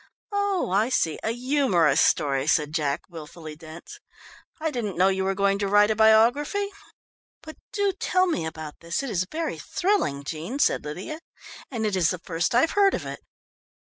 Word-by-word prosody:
"Oh, 405 - 0
I 210 +5 +2
see, 160 -11 0
a - - -2
humorous 230 - +2
story," 140 -2 +2
said 150 -1 +2
Jack, 145 -3 0
wilfully 160 -2 -10
dense. 165 - -11 0.6
"I 320 0 -1
didn't 215 - -4
know 185 +2 +4
you 190 0 0
were 195 0 0
going 200 0 +1
to 200 - 0
write 205 +2 +4
a - - +1
biography." 235 - +4 0.8
"But 315 0 -10
do 405 -1 0
tell 370 0 +2
me 335 - -1
about 155 -2 -8
this, 170 +10 -3
it 270 - -4
is 185 -2 -1
very 325 0 -3
thrilling, 360 - 0
Jean," 165 - -5
said - - +2
Lydia, 185 - -6 0.5
"and 230 -4 -3
it 210 -2 0
is 175 -4 +3
the 180 - -2
first 170 +7 -2
I've 260 +7 +4
heard 400 -1 +4
of - - -5
it." - - -6
200 Hz, 180 wpm, -25 LUFS, -, 0.8 s, know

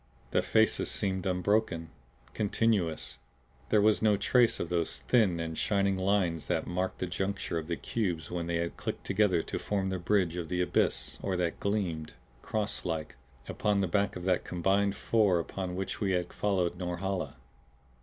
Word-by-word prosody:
The - - +3
faces 110 0 +2
seemed 95 -2 -1
unbroken, 90 -3 0 0.4
continuous; 100 -6 0 0.5
there 105 -2 +4
was 110 0 +4
no 105 -2 +4
trace 120 +3 +3
of 85 - -3
those 85 -2 +1
thin 105 -9 +3
and 80 -1 -3
shining 100 +1 +1
lines 95 -4 +1
that - - 0
marked 90 +1 -2
the - - -2
juncture 95 -1 -2
of 80 - -7
the 85 - -1
cubes 85 -6 -2
when 85 -1 -2
they 85 - -1
had 85 0 -2
clicked - - -4
together 95 -4 +2
to - - -4
form 95 -2 -1
the 95 - -2
bridge 90 -2 +1
of 85 -2 -4
the 90 - -1
abyss 90 - 0
or 95 -2 -1
that 90 - +1
had 85 - -2
gleamed, 90 -7 -2 0.3
crosslike, 90 -7 -2 0.3
upon 105 -1 +1
the 95 - +1
back 100 +2 +1
of 90 - -6
the 90 -1 +2
combined 100 +3 +1
four 105 -6 +3
upon 90 +2 -3
which 95 +3 -4
we 95 -2 +1
had 90 -1 -1
followed 90 -4 0
Norhala. 90 +1 -3
95 Hz, 175 wpm, -30 LUFS, 85-100 Hz, 0.5 s, there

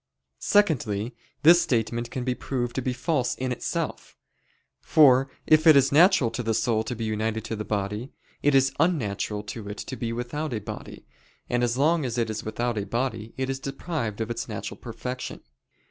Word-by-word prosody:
Secondly, 125 - +1 0.3
this 170 +3 +8
statement 120 -5 -1
can 125 - -4
be 125 0 0
proved 120 -1 -3
to 130 - -2
be 130 - -1
false 125 -1 0
in 130 0 -3
itself. 125 - -4 0.6
For 135 -3 +5 0.2
if 155 +1 +5
it 155 - +9
is 140 0 +5
natural 155 - +5
to 115 - -3
the 115 -2 0
soul 110 -1 +1
to 125 - -3
be 115 - -5
united 110 0 -1
to 115 - -4
the 105 - -4
body, 105 +4 -3 0.3
it 145 -1 +3
is 135 0 +4
unnatural 105 - 0
to 105 0 -7
it 100 - -6
to 130 - -6
be 115 -3 -3
without 120 +4 -3
a - - -1
body, - - -8 0.5
and 120 0 +2
as 120 0 0
long 155 +3 +3
as 125 -2 -3
it 115 -2 0
is 110 - -4
without 115 +1 -2
a 100 - -3
body 115 -1 -3
it 130 0 -1
is 135 0 -3
deprived 135 - -4
of 110 +1 -2
its 120 - -4
natural - - -5
perfection. 125 0 -6
125 Hz, 190 wpm, -26 LUFS, 110-135 Hz, 0.6 s, it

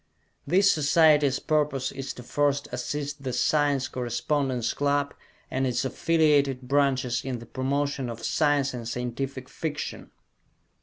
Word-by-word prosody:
This 195 +6 +5
Society's 150 -2 +4
purpose 150 -4 0
is 135 0 -5
to 125 - -10
first 145 +2 0
assist 145 -1 -4
the 130 -2 -3
Science 145 -1 +1
Correspondence 125 0 -1
Club 145 0 0 0.4
and 130 0 0
its 125 +1 -1
affiliated 145 -3 +2
branches 130 -2 +1
in 130 -2 -3
the 120 - -10
promotion 135 +1 -2
of 115 -1 -6
science 145 -3 +2
and 120 -2 -6
Scientific 125 +2 -4
Fiction. 150 0 -5
140 Hz, 125 wpm, -26 LUFS, 130-145 Hz, 0.4 s, This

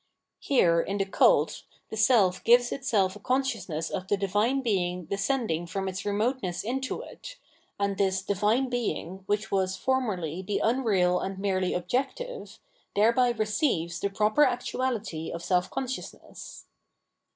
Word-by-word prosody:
Here 170 -12 +3
in 200 +3 -3
the 195 - 0
Cult, 195 - +3 0.3
the - - -4
self 215 -4 +3
gives 240 +1 +5
itself 210 -8 0
a - - -10
consciousness 210 - -1
of 185 - -4
the 205 - +1
Divine 210 +7 +1
Being 180 -7 -1
descending 200 - -1
from 195 +2 -3
its 190 +1 -4
remoteness 205 -2 -1
into 260 +4 -3
it, - - -10 0.4
and 200 -1 -1
this 190 -1 +1
Di'vine 210 +7 +1
Being, 220 -7 -3
which 205 +1 -1
was 190 -1 0
formerly 190 - -1
the 200 +2 -2
unreal 205 -7 +2
and 195 0 -4
merely 190 -2 0
objective, 270 - -3 0.4
thereby 235 +4 +4
receives 215 - 0
the 200 - -1
proper 215 +7 +3
actuality 245 - -1
of 170 - -6
self 180 0 +1
consciousness. 260 -1 -7
205 Hz, 140 wpm, -27 LUFS, 185-245 Hz, 0.4 s, gives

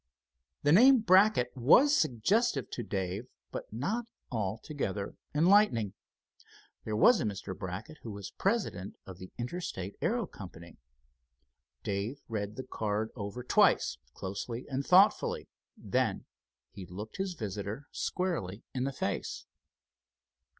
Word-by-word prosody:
The 145 - +4
name 250 - +8
Brackett 190 - +4
was 245 - +6
suggestive 135 - +1
to - - -3
Dave, 95 +4 -3 0.2
but - - -6
not 200 - -2 0.3
altogether 105 -1 -3 0.2
enlightening. 160 - +4 0.9
There 110 - -2
was 205 - +6
a - - 0
Mr. 100 -3 -4
Brackett 95 - -6
who 115 - -7
was 100 -2 -7
president 195 - -1
of 95 -1 -10
the 95 - -9
Interstate 120 - -4
Aero 235 0 +1
Company. 85 - -11 1.0
Dave 100 +8 -2
read 105 -2 -3
the 130 - -5
card 110 -2 -2
over 105 +2 -5
twice, - - +3 0.2
closely 110 +6 -5
and 135 0 -1
thoughtfully, 190 +7 +4 0.3
then - - 0 0.5
he 95 -3 -9
looked 105 +5 -8
his 190 -2 -2
visitor 105 - -5
squarely 150 - -2
in 130 0 -1
the 135 - -2
face. - - -3
115 Hz, 120 wpm, -31 LUFS, -, 1.0 s, name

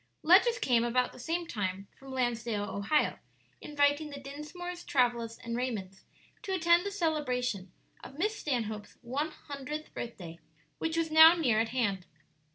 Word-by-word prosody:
Letters 395 +9 +6
came 240 - +2
about 250 +1 +1
the - - -13
same 335 +6 -2
time 195 - -3
from 270 0 -12
Lansdale, 235 -4 -1
Ohio, 205 +9 0 0.4
inviting 290 +1 +1
the 285 -1 -7
Dinsmores, 305 +6 -7
Travillas, 235 -4 +1
and 235 0 -5
Raymonds 210 -7 -4 0.4
to 385 - -4
attend 340 +2 +4
the - - -3
celebration 250 - -1 0.3
of 270 - -11
Miss 425 +6 0
Stanhope's 220 - -3
one 275 +6 -2
hundredth 300 0 -7
birthday, 175 -8 -7 0.4
which 325 0 -1
was 325 -1 0
now 320 +2 +9
near 250 -10 +2
at 225 0 +1
hand. 200 -8 -1
265 Hz, 150 wpm, -30 LUFS, 230-320 Hz, 0.4 s, now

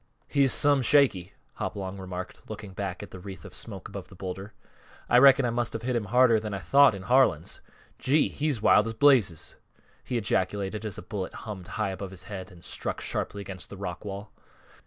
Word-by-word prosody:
"He's 140 -3 +3
some 145 -2 +4
shaky," 125 -9 +3 0.2
Hopalong 95 -1 -4
remarked, 90 -1 -7
looking 105 -2 -7
back 95 -1 -4
at 105 - -10
the 95 - -9
wreath 95 -3 -9
of - - -10
smoke - - -7
above - - -8
the - - -15
bowlder. 95 +2 -6 0.6
"I 125 - +6
reckon 135 0 +7
I 120 - +1
must 120 -1 -1
have 115 - -5
hit 125 0 -1
him 115 -3 0
harder 120 +1 +5
than 105 -2 -4
I - - -2
thought 135 +4 +5
in 95 - -8
Harlan's. 120 - +2 0.4
Gee! 145 +4 +3
he's 145 -7 -2
wild 105 +2 +5
as 115 - -4
blazes!" 120 - +3 0.5
he 125 - -2
ejaculated 105 0 -1
as 105 - -6
a - - -7
bullet 95 0 -5
hummed 95 -5 -7
high 110 -3 -2
above 95 0 -6
his 95 -1 -9
head 100 -2 -7
and 90 -3 -15
struck - - -3
sharply 100 - -3
against 95 -2 -8
the 100 - -9
rock 90 -2 -5
wall. 100 0 -7
105 Hz, 200 wpm, -27 LUFS, 95-125 Hz, 0.6 s, reckon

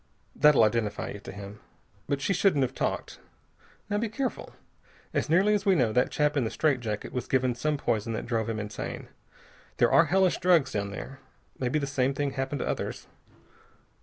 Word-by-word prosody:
That'll 150 -1 +6
identify 110 -1 0
you 105 - -7
to 100 - -9
him. 100 +1 -9 0.5
But 140 -1 0
she 195 - +1
shouldn't 180 -7 +3
have 130 - -2
talked. - - -3 0.7
Now, 205 0 0
be 230 0 -1
careful. 260 +4 -4 0.6
As - - -1
nearly 190 +6 +4
as 205 -1 +1
we 195 -1 +4
know, 120 -8 +2
that 125 +2 +3
chap 150 0 +1
in 140 - +2
the 110 - -1
straight 145 -1 +1
jacket 105 -3 -4
was 125 -1 -3
given 130 -1 +1
some 150 +5 -1
poison 115 -3 -1
that - - -4
drove 115 -2 -1
him 115 - -2
insane. 105 0 -6 0.7
There - - +3
are - - +6
hellish 190 -1 +2
drugs 165 -7 +3
down 100 -1 -2
there. 135 +6 -8 0.4
Maybe 130 +3 0
the 145 - -1
same 135 -1 0
thing 145 -1 -1
happened 135 +1 -3
to - - -2
others. - - -3
135 Hz, 195 wpm, -28 LUFS, 115-155 Hz, 0.7 s, That'll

